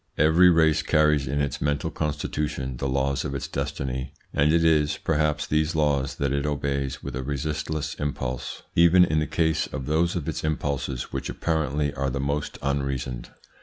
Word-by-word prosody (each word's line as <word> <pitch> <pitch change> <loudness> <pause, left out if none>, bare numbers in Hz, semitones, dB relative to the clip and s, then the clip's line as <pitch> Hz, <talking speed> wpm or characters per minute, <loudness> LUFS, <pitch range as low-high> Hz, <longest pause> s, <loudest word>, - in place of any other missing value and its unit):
Every 80 +4 +6
race 80 -2 +4
carries 75 -3 +3
in 70 +3 0
its 70 -3 -2
mental 75 0 0
constitution 75 -3 -3
the 70 +2 -2
laws 70 +1 0
of 70 - -3
its 70 - -3
destiny, 65 -1 -3 0.2
and 70 +2 +3
it 85 0 +3
is, 75 -2 +3
perhaps, 75 -1 0
these 75 +1 0
laws 70 -3 +1
that 70 -1 -1
it 70 0 0
obeys 70 -2 -2
with 70 -2 -5
a 65 - -2
resistless 75 +2 -3
impulse, 65 -4 -4
even 85 +2 +6
in 75 -2 +1
the 75 - -1
case 80 0 +1
of 65 - -5
those 80 +4 +1
of 85 -4 -3
its 80 - -3
impulses 70 -4 -2
which - - -3
apparently 75 -3 -1
are 70 0 -1
the 65 +1 -3
most 70 +2 -2
unreasoned. 70 -3 -2
75 Hz, 175 wpm, -25 LUFS, 70-80 Hz, 0.2 s, Every